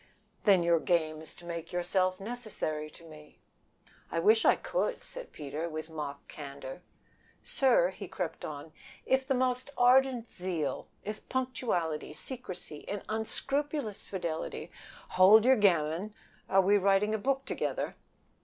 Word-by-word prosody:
"Then 190 -4 +6
your 170 -1 +4
game 155 -2 +1
is 160 - -10
to 175 - -13
make 170 -1 -5
yourself 185 +1 +1
necessary 200 -9 -3
to 170 - -15
me." 155 -2 -14 0.7
"I - - -2
wish 215 +7 +5
I - - +7
could," - - -2
said - - -8
Peter, 150 +3 -4
with 155 0 -6
mock 145 -3 -6
candor. 140 +1 -8 0.6
"Sir," 245 -10 +4
he 190 +1 -8
crept 180 -2 -4
on, 150 +1 -6 0.3
"if 265 0 +2
the 270 - +2
most 255 +1 0
ardent 250 -1 +4
zeal, 170 -7 -3 0.2
if 210 +1 -7
punctuality, 220 -13 -1
secrecy, 180 - -7
and 205 -1 -3
unscrupulous 270 +2 -2
fidelity 170 -5 -4 0.2
" - - -19
"Hold 210 +4 +8
your 265 +1 +7
gammon! 185 0 +2 0.3
Are 195 0 +5
we 200 +2 +4
writing 200 +2 +3
a 220 - 0
book 270 +4 0
together! - - -2
190 Hz, 145 wpm, -31 LUFS, 160-240 Hz, 0.7 s, Hold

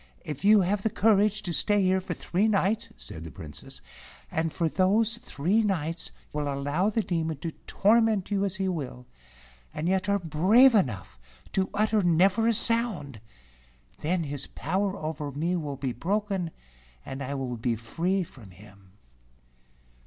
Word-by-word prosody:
If 150 +1 -6
you 210 0 +6
have 195 +2 0
the 220 - +1
courage 210 0 +2
to 175 - -3
stay 205 +3 +2
here 185 0 +2
for - - -4
three 195 +5 0
nights," 210 0 +1
said 60 +6 -9
the 80 - -7
Princess, 75 +1 -10 0.5
"and 160 0 -1
for 170 0 0
those 210 +7 +2
three 205 - 0
nights 165 -6 -2 0.2
will 145 -1 -1
allow 145 +8 0
the 220 +1 0
Demon 165 -4 -2
to 165 - -3 0.2
torment 215 -1 +2
you 200 -1 +1
as 195 -2 -1
he 190 0 -1
will, 140 -8 -4 0.7
and 155 - -3
yet 190 +1 +1
are 200 - +3
brave 195 - +5
enough 120 - 0 0.3
to 190 -1 +1
utter 215 +1 +2
never 185 +6 +3
a 230 - +4
sound, 205 - +1 0.8
then 170 +2 0
his 145 -2 -5
power 195 +1 -2
over 155 -3 -4
me 165 +6 -1
will 145 -5 -4
be 130 -2 -3
broken, 195 - -1 0.6
and 135 +1 -6
I 140 +1 -3
will 130 -3 -3
be 115 +1 -1
free 170 - -1
from 125 - -14
him." 95 0 -17
180 Hz, 160 wpm, -27 LUFS, 145-205 Hz, 0.8 s, you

